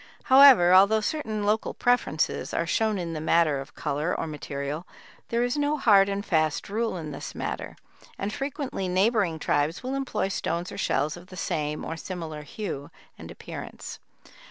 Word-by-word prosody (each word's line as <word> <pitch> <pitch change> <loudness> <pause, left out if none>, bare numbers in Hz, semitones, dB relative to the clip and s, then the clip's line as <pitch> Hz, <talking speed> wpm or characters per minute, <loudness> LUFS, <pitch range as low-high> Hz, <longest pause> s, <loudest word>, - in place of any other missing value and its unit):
However, 260 -10 +8
although 200 +4 +6
certain 215 -4 -2
local 215 +2 0
preferences 245 -11 0
are 165 - +1
shown 215 +4 +1
in 170 -2 -4
the 155 - -4
matter 155 -3 +2
of 135 - -12
color 150 +3 -2
or - - -2
material, 145 +1 -5 0.4
there 235 +1 +1
is 245 +4 -1
no 290 +1 +1
hard 200 -7 +5
and 200 +1 -3
fast 155 -3 0
rule 220 -1 -1
in 155 -3 -6
this - - -7
matter, - - -4 0.4
and 200 +2 -3
frequently 270 -7 -3
neighboring 190 -2 +2
tribes 150 +4 0
will 260 +1 -3
employ 270 -7 -1
stones 170 -2 -2
or - - -8
shells 150 +3 0
of 175 +1 -13
the 185 - -11
same 150 -5 -2
or 165 - -5
similar 165 -3 -6
hue 150 - -6 0.3
and - - -9
appearance. - - -8
185 Hz, 170 wpm, -26 LUFS, 155-220 Hz, 0.4 s, However